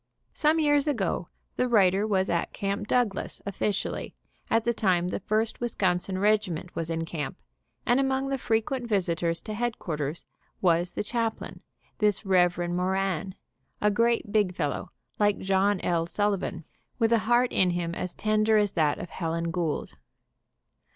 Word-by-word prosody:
Some 310 +1 +3
years 290 -1 +3
ago 200 - -1 0.3
the 250 - +2
writer 200 -3 +4
was 190 -3 +1
at 170 -1 -1
Camp 200 +1 -2
Douglas 235 -6 0
officially, 200 +1 -2 0.3
at 225 0 +3
the 235 - +1
time 180 -5 +1
the - - -2
First 215 +3 -1
Wisconsin 190 -5 0
regiment 195 -4 0
was 165 0 -3
in 165 0 -2
camp, 155 -4 -4 0.5
and 245 +2 +3
among 270 0 0
the 270 -1 -1
fre 225 - +1
quent 240 +2 -2
visitors 170 -5 0
to 215 - -6
headquarters 170 - -3 0.3
was 175 -1 +2
the - - -2
chaplain, 230 0 -3 0.4
this 210 0 +2
Rev. 180 -2 +3
Moran, 190 0 -1 0.4
a 210 - +3
great 230 0 +1
big 200 -4 +2
fellow 150 -5 -2 0.3
like 205 -1 +3
John 195 +1 +2
L. 170 -1 0
Sullivan, 195 -4 -1 0.3
with 225 -2 +2
a 230 - +5
heart 240 +1 +4
in 185 - +4
him 175 -1 -2
as 180 +1 -4
tender 215 0 +2
as 205 -2 +2
that 155 -4 +1
of 175 - -7
Helen 165 -1 -2
Gould. 165 -3 -2
195 Hz, 155 wpm, -27 LUFS, 175-225 Hz, 0.5 s, a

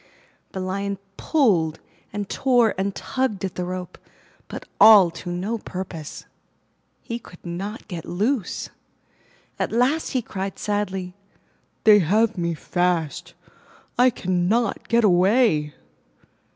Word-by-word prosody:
The 190 - -4
Lion 195 +2 -2 0.2
pulled 190 - +2 0.3
and 205 -1 -4
tore 245 -3 +2
and 195 +1 -2
tugged 255 -7 -2
at 190 - -4
the 180 - -3
rope, 180 0 -6 0.5
but - - -8
all 200 -6 +8
to 170 +2 -8
no 195 +6 -2
purpose. 180 -6 -7 0.8
He 235 0 -4
could 180 -6 -16
not 195 +6 -5
get 175 -5 -6
loose. 210 +5 -2 0.9
At - - -1
last 255 +7 +1
he 255 -3 0
cried 195 -2 -5
sadly, 195 -3 -2 0.7
'They 210 -1 +8
have 215 +6 +2
me 170 -2 -1
fast! 175 -2 -1 0.6
I 250 +1 +5
cannot 195 +1 0
get 235 0 +3
away! 180 - +3
195 Hz, 120 wpm, -23 LUFS, 180-225 Hz, 0.9 s, all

